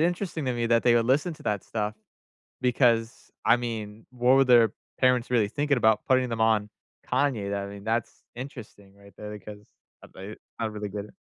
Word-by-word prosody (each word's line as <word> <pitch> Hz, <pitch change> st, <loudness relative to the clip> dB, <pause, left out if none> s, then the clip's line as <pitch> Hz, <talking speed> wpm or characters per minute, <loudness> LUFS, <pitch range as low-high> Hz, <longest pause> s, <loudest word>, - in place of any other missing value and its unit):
interesting 175 Hz, -2 st, -1 dB
to 125 Hz, -, +1 dB
me 120 Hz, -1 st, -1 dB
that 115 Hz, 0 st, +3 dB
they 120 Hz, -1 st, +5 dB
would 115 Hz, -1 st, +3 dB
listen 150 Hz, +6 st, +1 dB
to -, -, -16 dB
that 105 Hz, -2 st, -1 dB
stuff, 105 Hz, -1 st, -3 dB, 0.7 s
because, 120 Hz, -1 st, +1 dB, 0.2 s
I -, -, +6 dB
mean, 110 Hz, -3 st, -6 dB
what 125 Hz, +1 st, +3 dB
were 135 Hz, -, +5 dB
their 120 Hz, -4 st, +5 dB, 0.3 s
parents 125 Hz, -2 st, +3 dB
really 110 Hz, -4 st, +2 dB
thinking 145 Hz, +2 st, 0 dB
about 110 Hz, -2 st, +3 dB
putting 130 Hz, -1 st, +3 dB
them 115 Hz, -1 st, -4 dB
on 110 Hz, -2 st, +2 dB, 0.4 s
Kanye, 105 Hz, -8 st, 0 dB
I 100 Hz, 0 st, -3 dB
mean, 100 Hz, 0 st, -10 dB
that's 115 Hz, +1 st, -2 dB
interesting 115 Hz, -6 st, -10 dB
right 100 Hz, -2 st, -18 dB
there 105 Hz, 0 st, -8 dB
because, 105 Hz, +1 st, -11 dB, 0.4 s
uh, -, -, -13 dB
they 95 Hz, +3 st, -8 dB, 0.3 s
I 115 Hz, -, -2 dB
don't 110 Hz, -, -3 dB
really 105 Hz, -1 st, -5 dB
get 100 Hz, 0 st, -5 dB
it. -, -, -19 dB
115 Hz, 200 wpm, -26 LUFS, 105-125 Hz, 0.7 s, I